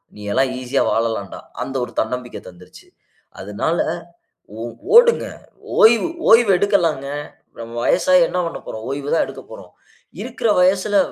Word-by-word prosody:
நீ 105 - -12
எல்லாம் 135 -1 +1
ஈசியா 130 +2 0
வாழலாண்டா", 110 -4 -2 0.2
அந்த 135 - -7
ஒரு 120 - -13
தன்னம்பிக்க 125 +2 -5
தந்துருச்சு. 90 0 -17 0.5
அதனால 105 - -2 0.8
ஓ - - -5 0.3
ஓடுங்க 475 0 +6 0.6
ஓய்வு 230 +7 +5 0.2
ஓய்வு 225 -2 +6
எடுக்கலாங்க. 175 -9 +1 0.5
நம்ம 115 0 -8
வயசாகி 275 -1 +3
என்ன 180 - -2
பண்ணப்போறோம். 110 -9 -7
ஓய்வு 140 +1 -4
தான் 165 - +3
எடுக்க - - -10
போறோம். - - -12 0.5
இருக்குற 230 -1 -2
வயசுல 195 +2 +2
145 Hz, 130 wpm, -19 LUFS, -, 0.8 s, ஓடுங்க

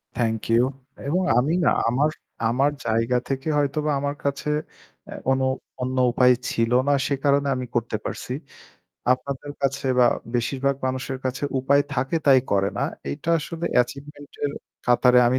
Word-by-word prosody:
Thank 115 -2 0
you 115 +1 +5 0.4
এবং 180 +6 +1 0.2
আমি 135 +6 +2
না - - +6 0.2
আমার, 135 +6 +2 0.4
আমার 135 +5 +2
জায়গা 115 +2 +1
থেকে 135 +1 -2
হয়তোবা 150 +1 0
আমার 145 +1 -2
কাছে 140 +1 -1 0.6
অ্যা - - -8
কোনো 130 0 +2 0.4
অন্য 130 +1 -2
উপায় 125 +1 +5 0.2
ছিল 115 +1 0 0.2
না 145 - +4
সে 140 - +1
কারণে 140 0 +3
আমি 125 - -3
করতে 115 -2 0
পারছি। 125 - -4 0.8
আপনাদের 140 +2 -4
কাছে 135 0 0
বা 125 - +7 0.3
বেশিরভাগ 135 +3 0
মানুষের 130 0 -3
কাছে 130 +1 -2 0.2
উপায় 140 +2 +3
থাকে 135 +5 0
তাই 135 -2 +8
করে 100 -1 +3
না। - - 0 0.3
এটা 115 - -3
আসলে 165 +2 -5
অ্যাচিভমেন্ট 140 +4 -1
এর 145 - 0 0.3
কাতারে 125 0 +5
আমি 130 +2 +2
130 Hz, 155 wpm, -24 LUFS, 125-140 Hz, 0.8 s, তাই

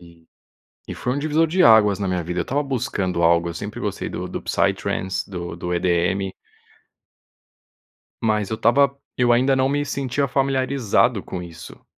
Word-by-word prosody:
E 85 -1 -18 0.6
e - - -5
foi 125 - -2
um - - -2
divisor 155 +2 +2
de 180 +4 +2
águas 105 -3 +6
na 100 - -1
minha 90 -1 -1
vida. 90 +2 -3
Eu - - +1
estava 145 +3 -1
buscando 95 -9 -2
algo, 85 0 +3
eu 85 - -6
sempre 105 +6 -6
gostei 105 - -3
do - - -6
do - - -5
do - - -19
psytrance, 95 +1 -1
do 85 -2 -5
do 90 +1 -4
EDM. 90 +2 0 1.9
Mas 105 -3 0
eu - - 0
estava 140 +5 +3 0.2
eu 120 -1 +4
ainda 130 +3 +3
não 130 0 +2
me 145 +1 0
sentia 140 0 -1
familiarizado 130 -5 +1
com 90 - -6
isso. 85 -2 -12
110 Hz, 175 wpm, -22 LUFS, 90-135 Hz, 1.9 s, águas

